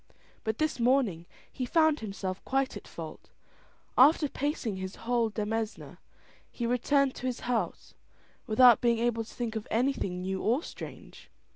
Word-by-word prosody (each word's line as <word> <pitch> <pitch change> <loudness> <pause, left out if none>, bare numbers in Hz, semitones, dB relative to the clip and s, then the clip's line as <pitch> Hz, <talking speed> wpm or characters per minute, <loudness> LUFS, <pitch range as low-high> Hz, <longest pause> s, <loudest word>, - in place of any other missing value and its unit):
But 220 0 -2
this 310 -4 -1
morning 235 -9 +2 0.2
he 255 - -4
found 315 +3 +3
himself 195 -3 -5
quite 270 0 0
at - - -9
fault; - - -9 0.7
after 295 +4 +6
pacing 275 - -2
his 190 0 -5
whole 235 -1 +2
demesne, 220 +1 -4 0.5
he 240 - -4
returned 265 +3 +2
to 255 - -3
his 250 - -3
house 240 -2 -2 0.5
without 240 +1 +7
being 235 -1 +3
able 230 -1 0
to 220 - -13
think 235 -2 -4
of 220 - -4
anything 225 -7 0
new 190 0 -2
or 245 +9 +1
strange. - - -10
235 Hz, 150 wpm, -29 LUFS, 215-260 Hz, 0.7 s, without